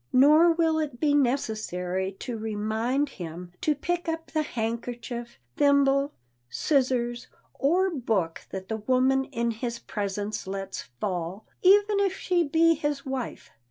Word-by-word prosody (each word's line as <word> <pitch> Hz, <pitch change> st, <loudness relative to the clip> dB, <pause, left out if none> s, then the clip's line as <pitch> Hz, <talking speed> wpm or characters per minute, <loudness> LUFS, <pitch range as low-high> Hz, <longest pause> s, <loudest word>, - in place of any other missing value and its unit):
Nor 305 Hz, +6 st, +6 dB
will 325 Hz, -1 st, +2 dB
it 285 Hz, -6 st, -3 dB
be 295 Hz, -2 st, +2 dB
necessary 215 Hz, -9 st, 0 dB
to 245 Hz, -, -4 dB
remind 220 Hz, +5 st, -1 dB
him 175 Hz, -, -8 dB
to 305 Hz, -, +2 dB
pick 345 Hz, +4 st, -2 dB
up 325 Hz, 0 st, -4 dB
the 310 Hz, -, +1 dB
handkerchief, 235 Hz, -1 st, -4 dB, 0.2 s
thimble, 280 Hz, 0 st, +3 dB, 0.4 s
scissors 250 Hz, -, 0 dB, 0.3 s
or 365 Hz, +7 st, +2 dB
book 220 Hz, -, -1 dB
that 190 Hz, -1 st, -6 dB
the 220 Hz, -, -2 dB
woman 260 Hz, +4 st, +2 dB
in 235 Hz, -4 st, -1 dB
his 235 Hz, +1 st, -4 dB
presence 205 Hz, -2 st, -4 dB
lets 195 Hz, 0 st, -4 dB, 0.2 s
fall,—even 220 Hz, -, +2 dB
if 390 Hz, -1 st, +1 dB
she 355 Hz, -2 st, +1 dB
be 330 Hz, +2 st, +4 dB
his 295 Hz, -2 st, -2 dB
wife. 265 Hz, -3 st, -5 dB
255 Hz, 130 wpm, -27 LUFS, 215-300 Hz, 0.4 s, Nor